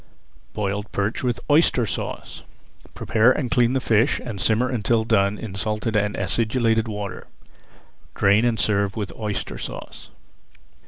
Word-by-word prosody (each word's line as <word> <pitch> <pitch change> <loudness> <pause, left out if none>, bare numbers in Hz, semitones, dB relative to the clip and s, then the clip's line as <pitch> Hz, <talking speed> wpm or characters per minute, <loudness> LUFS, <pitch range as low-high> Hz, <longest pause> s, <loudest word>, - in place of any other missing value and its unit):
BOILED 105 0 -3
PERCH 100 +2 -1
WITH 125 -2 0
OYSTER 145 -5 +3
SAUCE 100 - -5 0.5
Prepare 115 +2 +3
and 125 -3 -3
clean 120 0 +3
the 135 - +2
fish 115 +1 +2
and 105 -6 -6
simmer 115 +4 +2
until 115 -2 +1
done 100 -2 +2
in 110 -4 -7
salted 105 +2 -2
and 105 0 +1
acidulated 115 +3 +1
water. 105 -2 -6 0.9
Drain 100 +3 +4
and 120 -3 +1
serve 100 0 +1
with 105 -4 -4
Oyster 105 -2 -4
Sauce. - - -8
110 Hz, 140 wpm, -23 LUFS, 100-120 Hz, 0.9 s, Drain